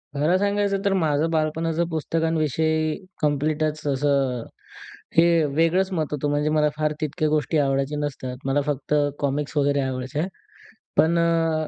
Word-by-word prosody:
खरं 155 +6 +2
सांगायचं 200 0 0
तर 200 - +3
माझं 160 -3 +1
बालपणाचं 160 +1 0
पुस्तकांविषयी 160 -1 0 0.3
कम्प्लीटच 150 +1 0
असं, 135 -3 +1 0.7
हे 165 -1 +5
वेगळंच 180 +4 +2
मत 160 -3 0
होतं. 145 0 -1
म्हणजे 145 +1 +1
मला 155 -1 +3
फार 155 0 0
तितक्या 155 +1 -1
गोष्टी 155 +1 +1
आवडायचे 135 0 +1
नसतात. 135 -4 -4
मला 140 +2 +2
फक्त 145 0 -2 0.3
कॉमिक्स 145 +1 -2
वगैरे 145 0 +2
आवडायच्या, 130 +4 -2 0.7
पण 165 +2 +4
अ, 165 -2 +1
155 Hz, 135 wpm, -24 LUFS, 145-165 Hz, 0.7 s, हे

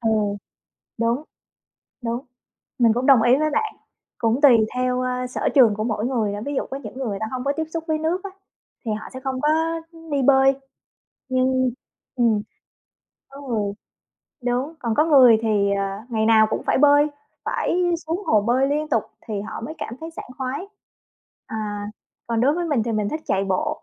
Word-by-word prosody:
Ừ, 225 - 0 0.9
đúng, 235 +4 +1 0.8
đúng. 235 +1 -2 0.6
Mình 230 -2 +5
cũng 245 +2 -1
đồng 265 -5 +7
ý 245 +3 +5
với 310 +1 +1
bạn, 430 +9 -1 0.4
cũng 230 +3 +1
tùy 240 -7 +6
theo, 250 0 0
ơ, 250 0 -2
sở 250 - -1
trường 240 -6 +6
của 215 +1 -3
mỗi 220 0 -1
người 225 -6 0
nữa, 205 - -4
ví 285 - -2
dụ - - -1
có 270 - -3
những 215 -6 -9
người 265 - -3
người 200 -2 -3
ta 220 - -1
hông 255 -1 -3
có 280 - +1
tiếp 320 - -1
xúc 330 -1 -3
với 310 -1 +1
nước 335 +4 -1
á, 395 - -5 0.5
thì 220 - -1
họ 215 +1 -5
sẽ 260 - -6
không 260 -1 -3
có 295 - +1 0.6
đi 280 - +1
bơi. 270 0 +5 0.7
Nhưng 255 0 +2 0.5
ừm, 230 -4 +3 0.9
có 275 +1 -12
người 210 -4 -1 0.7
đúng, 250 +6 -1
còn 235 -5 -1
có 300 - +4
người 260 -8 +7
thì, 205 -3 +2
ờ, 200 - 0 0.3
ngày 220 -1 0
nào 220 -1 +6
cũng - - -2
phải - - +2
bơi, 290 +1 +6 0.4
phải - - -1 0.3
xuống 335 +5 -2
hồ 215 - +4
bơi 250 +5 +2
liên 300 +2 -1
tục 225 - +2 0.3
thì 210 -2 -2
họ 215 +2 -6
mới 305 +7 -6
cảm 230 - -5
thấy 325 +1 -6
sảng 325 - -9
khoái. 265 +8 -3 0.8
Ờ, 220 - -6 0.7
còn 230 -1 0
đối 280 +5 +3
với 350 - -1
mình 275 -8 +1
thì 230 - -2
mình 210 -2 0
thích 310 +6 -3
chạy 195 +1 +1
bộ 190 -1 -1
250 Hz, 195 wpm, -23 LUFS, 225-285 Hz, 0.9 s, đồng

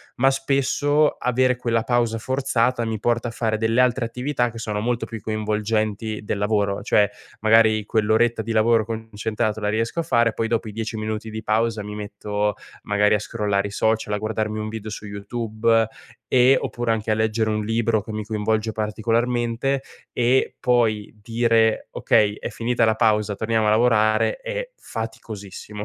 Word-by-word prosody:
ma 135 +2 +4
spesso 140 +2 +2
avere 125 0 +2
quella 115 -2 0
pausa 120 -2 +1
forzata 125 -1 0
mi 110 -2 -3
porta 120 +1 0
a - - -7
fare 110 -2 -1
delle 115 +2 +1
altre 125 -1 +3
attività 125 0 -1
che 115 - -10
sono 105 -2 -3
molto 120 +1 -1
più 115 -2 -8
coinvolgenti 110 0 -2
del 100 - -2
lavoro. 105 -1 0
Cioè 105 -1 +3 0.3
magari 110 0 +4
quell'oretta 110 +2 +2
di 115 - -4
lavoro 110 0 +3
concentrato 110 -1 -3
la 105 - 0
riesco 115 +9 -1
a - - -5
fare, 120 -7 +2
poi 115 - -1
dopo 115 -1 -1
i - - -6
10 110 0 -4
minuti 110 +1 -4
di 110 0 -5
pausa 110 0 0
mi 105 0 -7
metto 105 0 -2 0.3
magari 105 +1 +3
a - - 0
scrollare 105 -2 -1
i - - -9
social, 110 0 0
a - - +1
guardarmi 110 0 -2
un 110 - -3
video 110 -1 -6
su 105 - -7
YouTube 110 +2 0 0.4
e 130 +1 +5
oppure 120 -1 -2
anche 110 -1 -2
a - - +4
leggere 110 0 0
un 105 0 -1
libro 115 -1 +1
che 110 - -8
mi 110 0 -3
coinvolge 110 +1 -1
particolarmente 120 +4 0 0.3
e 125 +2 +1
poi 115 -4 +1
dire: 115 -1 +2
"Okay, 105 -2 +2
è - - -4
finita 120 0 0
la 110 0 +2
pausa, 105 -2 +2
torniamo 110 0 0
a - - +5
lavorare", 110 - +3
è - - -5
faticosissimo, 105 -2 -7
110 Hz, 170 wpm, -23 LUFS, 105-120 Hz, 0.4 s, e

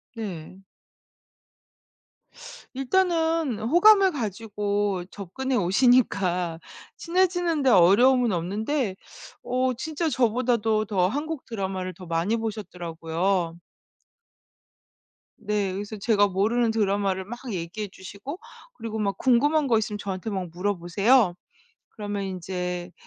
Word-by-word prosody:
네. 190 -4 -7 2.1
일단은 325 - +1
호감을 380 - +5
가지고 205 - -2
접근해 210 +8 -4
오시니까 190 -5 +2 0.4
친해지는 350 -3 +1
데 265 - +4
어려움은 235 +5 +5
없는데 205 - -1 0.5
어 255 +1 0
진짜 315 +6 -2
저보다도 230 -3 +1
더 190 -3 +1
한국 295 +6 -4
드라마를 190 -4 -4
더 180 +2 -12
많이 170 +6 0
보셨더라고요. 175 -5 -2 1.8
네, 210 -3 -1
그래서 205 +3 -5
제가 205 0 +3
모르는 220 +5 +1
드라마를 200 -3 0
막 240 +4 -7
얘기해 185 +3 -4
주시고 205 - -9 0.3
그리고 225 - -6
막 200 -2 -1
궁금한 290 +4 +3
거 230 -3 +3
있으면 210 -1 -2
저한테 195 +1 -4
막 185 -3 -3
물어보세요. 195 +4 +2 0.5
그러면 205 -2 -5
인제 180 -1 -4
210 Hz, 250 characters per minute, -25 LUFS, 185-255 Hz, 2.1 s, 호감을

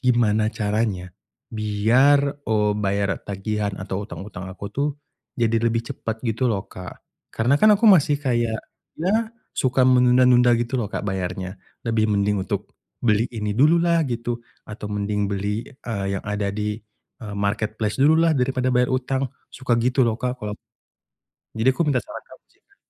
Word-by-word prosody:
gimana 115 -4 +2
caranya 105 -4 -1 0.4
biar, 125 +7 +3
eee, 105 -1 +2
bayar 100 -1 0
tagihan 100 0 -2
atau 95 +1 -4
hutang-hutang 95 -3 -8
aku 100 +2 -8
tuh 145 +2 0 0.5
jadi 115 -1 +2
lebih 115 0 +1
cepet 115 -4 -4
gitu 115 +3 0
loh, 100 -2 -2
Kak. 90 -1 -10 0.3
Karena 120 +5 +2
kan 215 -1 +7
aku 215 +3 -1
masih 150 -7 +5
kayak 120 -4 0 0.4
ya 215 +7 +1 0.3
suka 130 0 +2
menunda-nunda 125 -1 +5
gitu 120 +2 -1
loh, 110 - -1
Kak, - - -3
bayarnya. 95 0 -3 0.3
Lebih 110 -1 +1
mending 100 -1 +1
untuk 100 -2 -4 0.3
beli 110 0 +3
ini 105 -1 -2
dululah 170 +4 +4
gitu, 120 -1 -3 0.3
atau 105 0 -7
mending 105 0 -1
beli, 100 +3 -2
eee, 110 -6 -5
yang - - -12
ada 105 -1 -1
di, 105 0 -2 0.4
eee, 105 -2 -6
marketplace 105 +2 -1
dululah 160 +3 +5
daripada 130 0 0
bayar 125 0 +4
hutang, 130 +1 0 0.3
suka 130 -2 0
gitu 125 +2 +2
loh, 115 - +1
Kak, 125 0 -2
kalo 105 0 -4 1.0
jadi 115 +4 +3
aku 170 - -2
minta 135 -5 +1
saran - - -9
kamu - - -16
sih - - -33
Kak. - - -31
115 Hz, 155 wpm, -23 LUFS, 105-130 Hz, 1.0 s, kan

